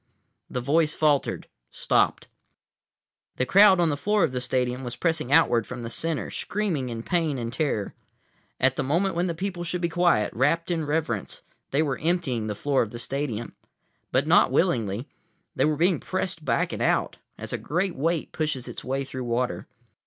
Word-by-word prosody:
The 125 - -3
voice 150 +4 +2
faltered, 150 -3 +1 0.2
stopped. - - +1 1.1
The 130 - 0
crowd 195 +3 +6
on 170 -2 +3
the 145 - 0
floor 205 +7 +1
of 160 - +2
the 125 -1 -3
stadium 125 0 -1
was 120 -1 -5
pressing 160 -6 -1
outward 120 -8 +4
from 125 -2 -6
the 115 - -5
center, 165 +1 -2
screaming 180 -11 -2
in 115 -1 -5
pain 165 -4 0
and 115 -1 -4
terror. 130 -8 -1 0.7
At 130 0 +2
the - - 0
moment 170 +8 +1
when 175 +2 0
the 170 - -2
people 180 0 -4
should 175 +1 -1
be 170 -1 0
quiet, 170 -11 +2
rapt 165 +8 +1
in 160 -3 -1
reverence, 145 -10 -2 0.3
they 145 +3 +2
were 140 -3 -2
emptying 150 -9 0
the 105 - -3
floor 140 +4 +1
of 115 - -1
the 120 - -8
stadium. 120 -3 -3 0.6
But - - +2
not - - +5
willingly. 110 +2 +1 0.5
They - - +2
were 150 -1 +1
being 175 +1 +2
pressed 180 -3 -3
back - - 0
and - - -4
out, - - +1 0.2
as - - -6
a - - 0
great 180 +4 -1
weight 160 +3 -1
pushes 150 -5 -2
its - - -7
way 135 +2 -2
through 130 -1 -6
water. 120 +1 -1
145 Hz, 185 wpm, -26 LUFS, 125-170 Hz, 1.1 s, crowd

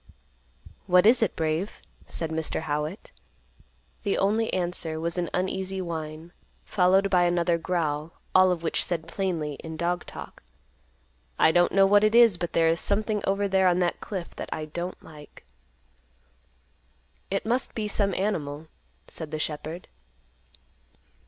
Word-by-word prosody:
"What 180 +1 +5
is 235 +2 +6
it, 225 - +1
Brave?" 160 +5 -2 0.3
said 165 -1 -3
Mr. 160 0 -2
Howitt. 150 +4 -4 0.9
The 200 - 0
only 215 +3 +1
answer 175 -3 -2
was 170 +2 -2
an 175 - -2
uneasy 190 +1 -2
whine, 160 -2 -5 0.3
followed 190 +1 +3
by 180 -2 +4
another 175 -1 +2
growl, 160 -3 -2 0.2
all 185 0 +6
of 170 -2 -2
which 165 - +1
said 165 -2 -3
plainly, 165 -6 -2
in 160 -1 -6
dog 175 +1 -1
talk, - - -10 1.0
"I 160 - +5
don't 175 +1 +3
know 195 0 +5
what 205 +1 +5
it 215 +1 +3
is, 230 -7 +6
but 175 - -3
there 165 -1 +3
is 165 +1 +2
something 210 +1 0
over 200 +1 +1
there 190 -1 +3
on 180 -1 +3
that 175 -1 0
cliff 185 -4 -6
that - - -5
I 155 - -3
don't 175 +4 -6
like." 150 -2 -14 1.8
"It 195 +2 -2
must 245 +4 -1
be 215 -2 -2
some 200 -2 0
animal," 155 -6 -2 0.4
said 160 -2 -6
the 155 - -4
shepherd. 155 +3 -5
175 Hz, 150 wpm, -26 LUFS, 160-195 Hz, 1.8 s, is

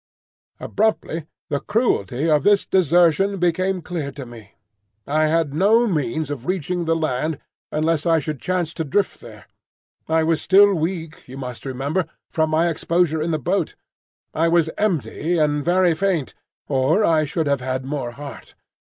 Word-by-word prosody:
Abruptly 185 -7 -1 0.2
the 140 - +1
cruelty 150 - 0
of 150 -2 +3
this 205 +5 +3
desertion 180 +2 +3
became 185 +1 0
clear 160 -6 -4
to 135 -2 -7
me. 115 -4 -13 0.5
I 155 +2 +2
had 160 -2 +1
no 210 +9 +4
means 155 - -1
of 135 -3 -6
reaching 180 -1 -1
the 165 0 +2
land 155 -1 -1 0.3
unless 155 +1 0
I 165 -1 +4
should 150 -3 -4
chance 180 -3 -1
to 160 - -3
drift 155 +1 -1
there. 110 -3 -12 0.6
I 160 0 +3
was 160 0 +1
still 200 +2 +6
weak, 165 -2 -4
you 130 +1 -9
must 125 -1 -7
remember, 140 +8 -1 0.3
from 160 -1 +1
my 160 +2 +2
exposure 170 -1 0
in 160 - -1
the 160 - +1
boat; 145 - -1 0.6
I 165 +2 +2
was 165 -1 +2
empty 175 -3 -1
and 150 -2 +1
very 180 +1 +3
faint, 175 -4 -1 0.3
or 145 +10 +2
I 155 -2 +3
should 160 +2 -2
have 140 -2 0
had 130 0 -3
more 135 -4 -4
heart. 140 +2 -10
160 Hz, 160 wpm, -21 LUFS, 145-175 Hz, 0.6 s, still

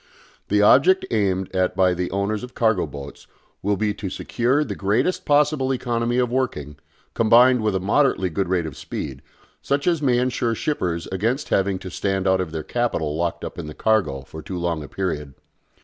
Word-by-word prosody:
The - - +3
object 375 0 +5
aimed 95 -2 0
at 95 0 +1
by 95 -1 +3
the 90 0 -2
owners 100 +3 -2
of 125 - -9
cargo 110 -7 +2
boats 70 0 -10 0.3
will 100 +1 0
be 105 0 0
to 100 -2 -5
secure 125 +9 0
the - - -4
greatest 125 - 0
possible 145 -2 +2
economy 120 -1 -1
of 125 -1 +1
working, 75 - -2 0.4
combined 120 +2 +5
with 105 -2 0
a - - +1
moderately 100 -2 +1
good 95 +2 -1
rate 90 -3 +1
of 75 -4 -6
speed, - - -6 0.4
such 140 +1 -1
as 170 -3 +2
may 130 -4 +3
ensure 120 -2 0
shippers 90 - -2
against 115 +9 -1
having 95 0 +1
to 95 0 -8
stand 95 -1 -1
out 95 0 +3
of 85 -4 -4
their 80 -1 -4
capital 80 -11 -1
locked 85 +1 -2
up - - -7
in - - -6
the 75 - -8
cargo 110 -11 +1
for 80 +3 -10
too 90 +4 -6
long 85 -2 -1
a - - -9
period. 75 -4 -4
100 Hz, 195 wpm, -22 LUFS, 90-125 Hz, 0.4 s, object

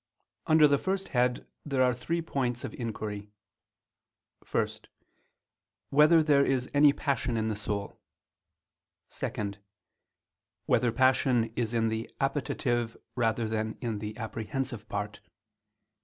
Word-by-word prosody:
Under 155 -1 +7
the 140 -1 +3
first 195 0 -2
head 125 -1 +1 0.2
there 135 -3 +1
are 125 -1 +3
three 165 +7 -2
points 125 -6 -2
of - - -5
inquiry: 105 -3 -5 1.2
(1) - - +2 1.2
Whether 155 +3 +6
there 145 -2 +4
is 130 -2 0
any 145 0 +7
passion 135 -5 -1
in 110 0 0
the 110 - -1
soul? 100 -1 -4 1.1
(2) 105 -5 -3 1.1
Whether 120 0 +3
passion 125 -2 +3
is 115 -2 -1
in 115 -1 +2
the 110 +1 -3
appetitive 135 -4 -1 0.2
rather 115 -1 +1
than 110 0 -2
in 115 -4 -3
the 105 +1 -6
apprehensive 115 +1 -4
part? 105 +1 -4
120 Hz, 120 wpm, -29 LUFS, 110-140 Hz, 1.2 s, Under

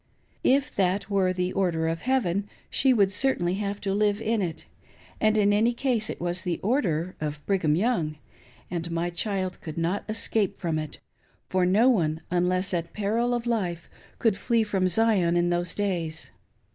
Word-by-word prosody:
If 280 +2 +2
that 195 +2 +1
were 190 -2 +2
the 180 0 -2
"Order" 170 -4 0
of 165 0 -2
"Heaven," 205 -7 0 0.2
she 265 - +4
would 200 -6 +3
certainly 200 -6 +1
have 200 0 -3
to 195 -1 -1
live 205 0 +2
in 225 -1 0
it; 170 -4 -4 0.5
and 215 0 +3
in 205 -1 +4
any 230 +3 +2
case 240 -4 0
it - - -5
was 175 +1 0
the 180 -3 -2
"order" 185 - 0
of 150 -1 -4
Brigham 175 -7 +2
Young, 170 -7 0 0.5
and 170 -1 -3
my 170 +1 -1
child 185 0 -2
could 155 -1 -7
not 170 +4 -1
escape 215 -2 0
from 165 -4 -1
it, 155 -2 -6 0.5
for 185 -1 +2
no 210 +7 +4
one, 160 -10 +2
unless 180 +2 +1
at 170 -1 -2
peril 225 +4 0
of 240 -1 -3
life, 185 -8 -2 0.3
could 225 -4 +2
flee 230 +2 +1
from 195 -3 0
Zion, 185 -3 +3
in 175 0 +2
those 175 0 -1
days. 170 -6 -2
190 Hz, 175 wpm, -26 LUFS, 175-215 Hz, 0.5 s, she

